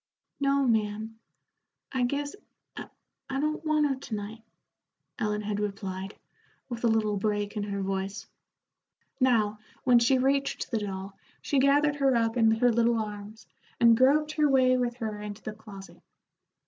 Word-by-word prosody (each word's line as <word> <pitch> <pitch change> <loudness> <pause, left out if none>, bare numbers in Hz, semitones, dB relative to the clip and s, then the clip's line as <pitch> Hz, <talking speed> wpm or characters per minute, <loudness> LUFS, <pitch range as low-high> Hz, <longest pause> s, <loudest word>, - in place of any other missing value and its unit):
"No, 275 -1 +2
ma'am; 220 0 -1 0.7
I 260 - -1
guess 285 +4 -3 0.4
I - - -6 0.4
don't 300 +4 -1
want 310 -1 +2
her 280 - +1
to 250 -4 -6
night," 210 +2 -7 0.8
Ellen 210 0 -1
had 205 0 -2
replied, 195 -1 -4 0.5
with 240 -1 -6
a - - +4
little 215 -2 +1
break 205 0 -1
in 210 - -2
her 200 -1 -3
voice. 195 +1 -3 0.9
Now, 220 -5 +2 0.2
when 245 -2 +5
she 255 +3 +3
reached 275 +2 0
the 230 - 0
doll, 195 -1 -6 0.2
she 280 - 0
gathered 290 +2 +3
her 270 -2 +3
up 230 0 +1
in 225 -2 +4
her 235 +2 +3
little 235 0 +2
arms, 210 +1 -6 0.3
and 230 -1 +6
groped 290 +5 +3
her 300 -1 +2
way 255 -1 +4
with 245 -1 -1
her 215 -4 -5
into 210 0 -7
the 215 - -5
closet. 205 -3 -12
225 Hz, 155 wpm, -28 LUFS, 210-265 Hz, 0.9 s, and